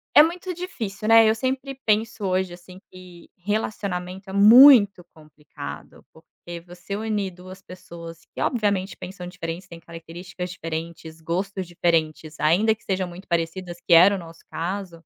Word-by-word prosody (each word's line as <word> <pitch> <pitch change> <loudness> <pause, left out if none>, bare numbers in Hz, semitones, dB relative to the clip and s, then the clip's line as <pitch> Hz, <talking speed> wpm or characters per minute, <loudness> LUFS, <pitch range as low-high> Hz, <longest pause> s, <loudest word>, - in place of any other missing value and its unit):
é 295 - +10
muito 360 +2 -3
difícil, 225 - -6
né? 225 -1 +7
Eu 220 - +2
sempre 265 +3 -3
penso, 215 0 0
hoje, 185 -1 -1
assim, 180 +1 -13
que 180 -2 -14
relacionamento 190 -1 -4
é - - -7
muito 210 -2 +8
complicado, 150 -1 -11
porque 170 +1 -12
você 180 +3 -8
unir 210 -3 -2
duas 185 +2 -13
pessoas 170 -3 -11
que, - - -6
obviamente, 200 -5 0
pensam 180 -1 -9
diferente, 175 0 -7
têm 170 -2 -11
características 170 +2 -8
diferentes, 165 -1 -7
gostos 185 +3 -3
diferentes, 160 -3 -1
ainda 190 +9 +3
que 220 - -29
sejam 190 -1 -2
muito 175 +2 -12
parecidas, 170 +1 -3
que - - +3
era 180 +5 +7
o - - -3
nosso 165 -1 -12
caso, 175 -1 -5
185 Hz, 150 wpm, -23 LUFS, 170-205 Hz, -, é